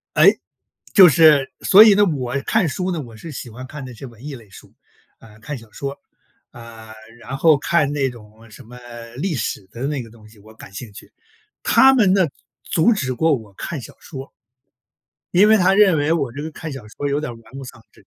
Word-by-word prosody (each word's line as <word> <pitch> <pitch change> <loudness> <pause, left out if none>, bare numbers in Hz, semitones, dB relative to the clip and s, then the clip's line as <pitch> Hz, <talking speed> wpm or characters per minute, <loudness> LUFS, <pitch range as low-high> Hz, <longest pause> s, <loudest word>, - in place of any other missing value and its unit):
哎， - - +7 0.6
就 190 -3 +9
是 150 -3 +5
所 205 +3 +8
以 220 -2 +7
呢， 205 +1 +4
我 140 -7 -3
看 215 -6 +1
书 180 +6 -3
呢， 170 - -3
我 120 -5 -9
是 155 +9 -10
喜 125 -3 -8
欢 125 +4 -10
看 140 0 -9
那 125 - -10
些 120 - -10
文 120 0 -14
艺 150 -2 -6
类 110 -5 -15
书， - - -16 0.5
呃， 110 -1 -17
看 140 +6 -7
小 115 -3 -16
说 140 +4 -5 0.6
儿， 120 - -14
啊， 110 -1 -12 0.3
然 130 +5 -6
后 155 0 +4
看 150 0 0
那 135 -2 0
种 110 -1 -16
什 - - -13
么 125 +2 -14 0.4
历 160 +4 -3
史 110 -4 -4
的 120 - -8
那 145 -4 -3
个 115 - -14
东 110 -1 -18
西， 110 0 -20
我 110 +2 -17
感 100 -3 -14
兴 115 +1 -8
趣， 100 - -13 0.5
他 265 0 +5
们 210 -8 +3
呢， 190 -3 +3 0.3
阻 170 +8 +1
止 130 - -1
过 160 +5 +1
我 110 -4 -11
看 150 - -6
小 - - -12
说。 135 -3 -10 1.0
因 200 +4 +5
为 220 - +6
他 185 0 +3
认 195 -5 +4
为 145 +3 +1
我 140 -7 -2
这 140 +4 -7
个 160 - -6
看 155 0 -8
小 135 - -8
说 145 +6 -5
儿 - - -2
有 140 - 0
点 150 -5 -5
儿 120 - -10
玩 115 +1 -19
物 135 - -8
丧 125 -3 -12
志。 - - -23
135 Hz, 245 characters per minute, -20 LUFS, 115-160 Hz, 1.0 s, 就